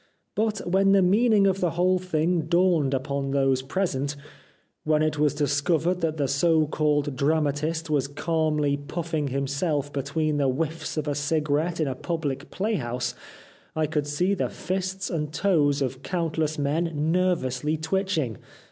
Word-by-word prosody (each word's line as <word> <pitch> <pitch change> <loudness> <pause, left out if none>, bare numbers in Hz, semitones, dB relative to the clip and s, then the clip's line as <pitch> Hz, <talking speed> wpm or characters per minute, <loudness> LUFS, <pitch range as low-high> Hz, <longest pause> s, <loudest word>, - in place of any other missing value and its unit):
But 215 -2 -1
when 195 +2 +4
the 195 -1 +5
meaning 210 +2 +4
of 195 -1 +2
the 180 - +1
whole 185 +1 +3
thing 170 -2 0
dawned 170 -5 +3
upon 140 +1 -2
those 135 -1 +2
present, 145 -2 -2 0.7
when 155 0 +2
it 155 -1 0
was 150 -1 +2
discovered 155 +5 +1
that 160 -1 -1
the 140 -2 +1
so 155 +3 +3
called 145 -2 0
dramatist 155 +3 0
was 145 -3 +1
calmly 150 -1 0
puffing 155 +1 -3
himself 140 +2 -1
between 145 +2 -1
the 140 -2 +2
whiffs 160 +5 -3
of 155 -1 -2
a 145 - +1
cigarette 150 +3 0
in 155 - +1
a 135 - -1
public 145 -1 -3
playhouse 125 - -2 0.6
I 155 0 +1
could 150 -1 -1
see 175 +7 +1
the 195 - -1
fists 190 0 -3
and 150 -3 -2
toes 150 -6 +2
of 130 0 -4
countless 160 -2 -1
men 155 +4 0 0.2
nervously 155 -5 0
twitch 190 +4 -1
ing. 120 -9 -2
155 Hz, 155 wpm, -25 LUFS, 145-175 Hz, 0.7 s, the